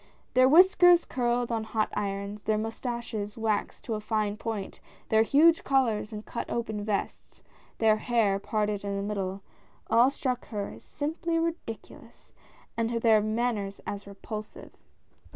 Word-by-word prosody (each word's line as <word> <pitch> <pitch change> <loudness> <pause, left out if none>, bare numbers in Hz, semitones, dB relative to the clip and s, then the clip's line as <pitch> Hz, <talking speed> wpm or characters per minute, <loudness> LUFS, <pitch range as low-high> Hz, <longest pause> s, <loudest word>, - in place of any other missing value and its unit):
Their 255 +1 +6
whiskers 355 +1 +7
curled 240 -1 0
on 225 -1 -1
hot 220 -1 -1
irons, 200 +1 -3
their 215 0 0
moustaches 225 -1 -4
waxed 220 -2 -1
to 230 - -2
a 215 - -2
fine 215 -1 -1
point, 215 -3 -5 0.3
their 220 0 +5
huge 315 +8 +5
collars 235 -6 +1
and 215 0 -7
cut 235 - -5
open 220 -3 -3
vests, 205 -1 -4 0.3
their 220 -1 +4
hair 215 -4 +1
parted 210 -1 -1
in 200 0 -2
the 200 - -2
middle, 195 -2 -3 0.5
all 240 +3 +6
struck 255 -3 -3
her 205 -3 -4
as 110 - -12
simply 330 +3 -2
ridiculous, 330 -9 -6 0.4
and 230 -1 0
their 220 -2 +5
manners 215 -2 -1
as 200 0 -5
repulsive. 210 +2 -8
220 Hz, 145 wpm, -28 LUFS, 210-245 Hz, 0.5 s, whiskers